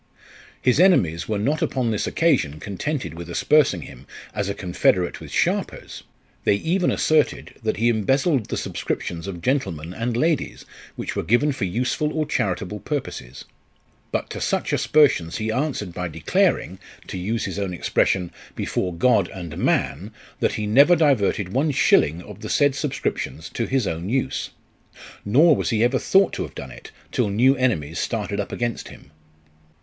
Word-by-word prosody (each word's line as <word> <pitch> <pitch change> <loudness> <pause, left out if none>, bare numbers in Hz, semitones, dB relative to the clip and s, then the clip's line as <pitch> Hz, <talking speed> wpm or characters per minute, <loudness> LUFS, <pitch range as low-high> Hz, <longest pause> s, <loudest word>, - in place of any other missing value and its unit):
His 130 +3 +2
enemies 90 - +3
were 105 - 0
not 145 - 0
upon 130 -7 0
this 105 - -1
occasion 125 - +1
contented 100 - -4
with 85 +1 -8
aspersing 115 - +3
him, 65 +3 -13 0.3
as 105 -2 -2
a 100 - -2
confederate 90 -1 +1
with - - -9
sharpers; - - -1 0.4
they - - +3
even 175 - +1
asserted, 155 -1 +1
that 110 -1 -1
he 115 +2 +2
embezzled 130 - +2
the - - -3
subscriptions 85 +1 -4
of 90 -3 -7
gentlemen 95 - -1
and 115 +3 -2
ladies, 160 +2 0 0.3
which - - -5
were - - 0
given 130 +7 +2
for 130 - -2
useful 120 +9 -1
or 155 - +1
charitable 105 -7 -2
purposes. 70 - -5 0.7
But - - -2
to - - -5
such - - -1
aspersions 135 - +3
he 110 0 -2
answered 125 - -2
by 90 +1 -3
declaring, 80 - 0 0.3
to - - -6
use 110 +6 -2
his - - -4
own 100 -2 -2
expression, 90 0 0 0.2
before 90 -2 -2
God 100 -1 +3
and 85 -5 -7
man, 70 +11 0 0.3
that - - +1
he 105 - -2
never 140 +11 +6
diverted 115 - +2
one 140 +5 +2
shilling 85 - +3
of - - -11
the - - -7
said 145 -1 +3
subscriptions 130 - -3
to 115 - -3
his 130 -4 +1
own 85 +2 -3
use; 130 +2 -1 0.7
nor 150 +10 +5
was - - -1
he 115 -2 +2
ever 125 +2 +2
thought 195 0 +3
to - - -3
have - - -6
done 65 - -7
it - - -11 0.2
till - - +1
new 125 +7 +4
enemies 90 - 0
started 105 -3 -2
up 100 - -3
against 120 -1 -3
him. 70 - -14
110 Hz, 165 wpm, -23 LUFS, 90-135 Hz, 0.7 s, never